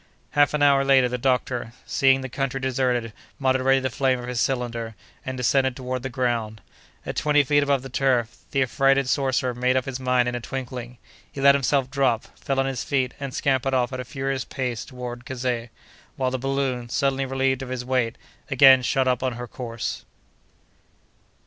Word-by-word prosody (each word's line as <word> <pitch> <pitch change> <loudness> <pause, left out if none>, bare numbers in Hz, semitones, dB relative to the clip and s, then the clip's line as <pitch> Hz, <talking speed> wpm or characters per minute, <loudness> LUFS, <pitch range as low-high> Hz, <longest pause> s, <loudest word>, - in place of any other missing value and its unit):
Half 145 +1 +3
an 145 - +1
hour 140 -1 +5
later, 135 -2 +5
the 125 0 -3
doctor, 125 -2 -1
seeing 135 -1 +3
the 130 - -4
country 135 +1 -2
deserted, 125 -3 -1 0.2
moderated 130 0 +2
the 130 - -1
flame 130 0 +1
of 120 - -7
his 125 -2 -1
cylinder, 120 -3 -2 0.3
and 130 -2 -5
descended 130 +1 +2
toward 130 -1 -4
the 130 - -4
ground. 120 -4 -2 0.5
At - - -4
twenty 150 -1 +3
feet 145 +2 +3
above 140 -2 +1
the 135 - -8
turf, 125 -3 0
the 135 - +2
affrighted 135 +1 +2
sorcerer 130 -2 +1
made 125 +2 +1
up 130 - 0
his 135 -1 -4
mind 125 -1 +2
in 125 - -1
a 120 - -2
twinkling: 125 -1 -6 0.3
he - - -8
let 140 +1 +7
himself 135 -1 +1
drop, 130 -5 0
fell 135 -1 -1
on 135 - +2
his 135 -3 -2
feet, 130 -3 0
and 140 -1 -4
scampered 135 0 0
off 125 0 0
at 130 - -4
a - - -3
furious 135 0 -3
pace 125 -4 -4
toward 125 -2 -7
Kazeh; 125 -2 -3 0.5
while 130 -1 -1
the 130 - -2
balloon, 135 -2 -2
suddenly 135 0 0
relieved 135 0 0
of 135 - -6
his 125 -1 -4
weight, 125 -3 0 0.3
again 135 -1 +7
shot 130 +1 +1
up 125 -1 +1
on 130 -1 -1
her 120 +1 -6
course. 115 -2 -5
130 Hz, 190 wpm, -24 LUFS, 125-135 Hz, 0.5 s, let